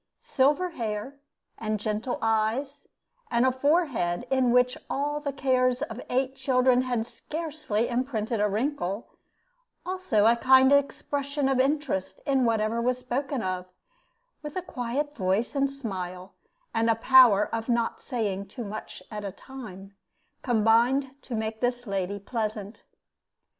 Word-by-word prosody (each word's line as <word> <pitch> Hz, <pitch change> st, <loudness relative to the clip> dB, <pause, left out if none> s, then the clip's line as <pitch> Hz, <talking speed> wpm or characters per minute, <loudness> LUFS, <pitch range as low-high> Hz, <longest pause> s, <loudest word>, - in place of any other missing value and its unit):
Silver 295 Hz, +7 st, +2 dB
hair, 230 Hz, +1 st, -4 dB, 0.4 s
and 215 Hz, -1 st, -2 dB
gentle 215 Hz, +4 st, -2 dB
eyes, 225 Hz, +5 st, 0 dB, 0.4 s
and 235 Hz, +1 st, +2 dB
a 260 Hz, -, +4 dB
forehead 260 Hz, -, +1 dB
in 260 Hz, -2 st, +3 dB
which 250 Hz, +1 st, +4 dB
all 295 Hz, +2 st, -1 dB
the 290 Hz, -1 st, -3 dB
cares 255 Hz, -1 st, +1 dB
of 240 Hz, -4 st, -6 dB
eight 260 Hz, +1 st, 0 dB
children 255 Hz, -2 st, +3 dB
had 245 Hz, -3 st, -1 dB
scarcely 300 Hz, -7 st, -3 dB
imprinted 235 Hz, -3 st, -1 dB
a 210 Hz, -, +3 dB
wrinkle, 215 Hz, -2 st, -2 dB, 0.8 s
also 365 Hz, -, +1 dB
a 230 Hz, +1 st, +6 dB
kind 260 Hz, +3 st, +6 dB
expression 280 Hz, 0 st, 0 dB
of 270 Hz, -1 st, +1 dB
interest 270 Hz, -8 st, 0 dB
in 270 Hz, -3 st, +2 dB
whatever 225 Hz, 0 st, +1 dB
was 250 Hz, +1 st, +1 dB
spoken 255 Hz, +1 st, -3 dB
of, 185 Hz, -1 st, -3 dB, 0.7 s
with 295 Hz, -1 st, -7 dB
a 370 Hz, -, -2 dB
quiet 290 Hz, 0 st, -3 dB
voice 195 Hz, +4 st, 0 dB
and 275 Hz, 0 st, +2 dB
smile, 190 Hz, -8 st, -6 dB, 0.4 s
and 225 Hz, +1 st, +2 dB
a 225 Hz, -, +4 dB
power 230 Hz, -3 st, +6 dB
of 230 Hz, +1 st, -3 dB
not 235 Hz, -1 st, 0 dB
saying 200 Hz, -5 st, -2 dB
too 240 Hz, +5 st, -7 dB
much 215 Hz, +1 st, -7 dB
at 210 Hz, -1 st, -5 dB
a 200 Hz, -, -4 dB
time, 200 Hz, -6 st, -10 dB, 0.5 s
combined 240 Hz, +3 st, +3 dB
to 250 Hz, -, -6 dB
make 220 Hz, 0 st, -3 dB
this 245 Hz, 0 st, -1 dB
lady 195 Hz, -1 st, -2 dB
pleasant. 215 Hz, 0 st, -4 dB
245 Hz, 140 wpm, -27 LUFS, 215-270 Hz, 0.8 s, a